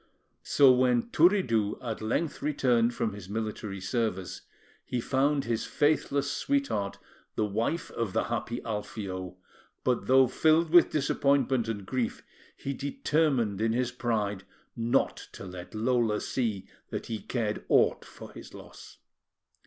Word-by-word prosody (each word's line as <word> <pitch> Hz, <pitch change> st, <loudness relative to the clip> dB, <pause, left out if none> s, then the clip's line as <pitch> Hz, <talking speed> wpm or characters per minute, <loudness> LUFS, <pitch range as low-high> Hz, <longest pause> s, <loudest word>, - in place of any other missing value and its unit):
So 140 Hz, -2 st, +5 dB
when 125 Hz, -2 st, +2 dB
Turiddu 125 Hz, -, +3 dB
at 115 Hz, -3 st, -5 dB
length 120 Hz, +9 st, -1 dB
returned 125 Hz, -5 st, +2 dB
from 110 Hz, -3 st, -1 dB
his 100 Hz, -2 st, -10 dB
military 105 Hz, -2 st, -4 dB
service, 95 Hz, -2 st, -2 dB, 0.4 s
he 125 Hz, -2 st, -3 dB
found 140 Hz, +4 st, +1 dB
his 115 Hz, -1 st, -2 dB
faithless 145 Hz, -1 st, +1 dB
sweetheart 275 Hz, -, -1 dB, 0.4 s
the 110 Hz, -, +1 dB
wife 115 Hz, +11 st, -2 dB
of 115 Hz, -4 st, -2 dB
the -, -, +1 dB
happy 120 Hz, +1 st, -3 dB
Alfio; 95 Hz, -4 st, -5 dB, 0.5 s
but 125 Hz, -2 st, 0 dB
though 130 Hz, +1 st, +6 dB
filled 155 Hz, +5 st, +2 dB
with 175 Hz, -1 st, +7 dB
disappointment 140 Hz, -4 st, +1 dB
and 105 Hz, -3 st, -4 dB
grief, 125 Hz, +2 st, -2 dB, 0.3 s
he 140 Hz, -, -4 dB
determined 140 Hz, -6 st, 0 dB
in 110 Hz, 0 st, +2 dB
his 125 Hz, 0 st, 0 dB
pride 105 Hz, -6 st, -2 dB, 0.3 s
not 120 Hz, +3 st, +1 dB, 0.2 s
to -, -, -9 dB
let 90 Hz, +1 st, -9 dB
Lola 115 Hz, -1 st, +1 dB
see 110 Hz, -7 st, -2 dB, 0.2 s
that -, -, -4 dB
he 110 Hz, -2 st, -4 dB
cared 110 Hz, -4 st, -2 dB
aught -, -, +3 dB
for -, -, -12 dB
his -, -, -11 dB
loss. -, -, -13 dB
120 Hz, 135 wpm, -28 LUFS, 105-135 Hz, 0.5 s, with